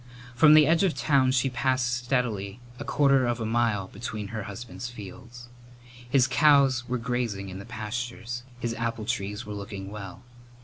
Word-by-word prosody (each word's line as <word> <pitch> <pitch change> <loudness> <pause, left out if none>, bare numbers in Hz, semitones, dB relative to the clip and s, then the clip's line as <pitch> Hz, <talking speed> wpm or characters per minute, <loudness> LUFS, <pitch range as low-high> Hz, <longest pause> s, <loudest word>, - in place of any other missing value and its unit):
From 150 +5 +7
the 155 -1 +8
edge 165 +4 +3
of 185 -4 +2
town 135 -3 +3
she 130 0 +2
passed 130 -1 0
steadily 120 -4 -1 0.2
a - - -4
quarter 140 -2 +3
of 120 0 -1
a 110 - -2
mile 110 -4 +1
between 110 -2 -6
her 110 0 -4
husband's 120 +3 -7
fields. 120 +2 -11 0.6
His 130 -1 +4
cows 135 -4 +4
were 125 - 0
grazing 115 -5 -2
in 95 +1 -7
the 100 - -9
pastures. 120 +1 -5 0.2
His 120 -1 -2
apple 115 -1 -3
trees 105 -1 -3
were 105 - -6
looking 100 -1 -7
well. 100 +1 -8
120 Hz, 170 wpm, -27 LUFS, 105-130 Hz, 0.6 s, the